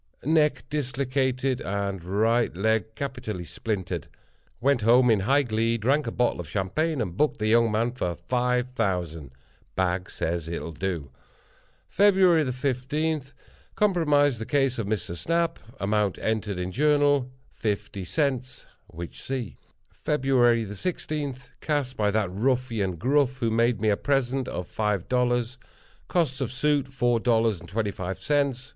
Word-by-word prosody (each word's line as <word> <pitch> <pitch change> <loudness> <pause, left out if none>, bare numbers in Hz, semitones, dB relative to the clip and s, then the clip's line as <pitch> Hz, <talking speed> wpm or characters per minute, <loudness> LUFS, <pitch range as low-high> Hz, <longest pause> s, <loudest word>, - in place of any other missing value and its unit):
Neck 150 -3 +3
dislocated, 130 -2 -1
and 100 -2 -3
right 110 +4 +1
leg 110 +1 0
capitally 125 -9 -4
splintered. 90 0 -4 0.5
Went 135 0 +2
home 120 +3 +5
in 110 - +4
high 135 +9 +3
glee, 115 -1 0
drank 135 +5 +1
a - - -1
bottle 120 -4 0
of 85 -4 -6
champagne, 135 - -1
and 90 -6 -3
booked 150 +8 +1
the 110 - -2
young 115 +1 +4
man 115 +3 +1
for 90 -8 -3
five 125 +2 0
thousand. 90 - -2 0.5
Bag 90 0 0
says 85 -1 -3
it'll 85 0 -4
do. 80 -4 -4 0.8
"Feb. 200 +1 +4
15.—Compromised 145 - +1
the 110 - -4
case 135 -4 +1
of 110 - -2
Mr. 105 -5 -2
Snap. 170 - 0 0.2
Amount 105 -1 +1
entered 110 -3 -1
in 90 +1 -3
Journal—fifty 130 -7 0
cents—which 125 - -4
see. 130 -5 -4 0.3
"Feb. 150 -2 -2
16.—Cast 130 - 0
by 105 -1 +1
that 100 -3 0
ruffian, 115 -3 0
Gruff, 135 - +1
who 115 -3 0
made 115 0 +2
me 110 +1 +2
a 100 - +2
present 135 -2 0
of 90 +1 -4
five 105 -4 -1
dollars. 125 0 0 0.5
Costs 145 -7 0
of 125 - -1
suit, 140 +1 +1
four 120 -3 +1
dollars 115 -4 +2
and 85 - -13
twenty 105 +1 -1
five 95 0 -5
cents. 140 -3 0
120 Hz, 135 wpm, -26 LUFS, 105-135 Hz, 0.8 s, home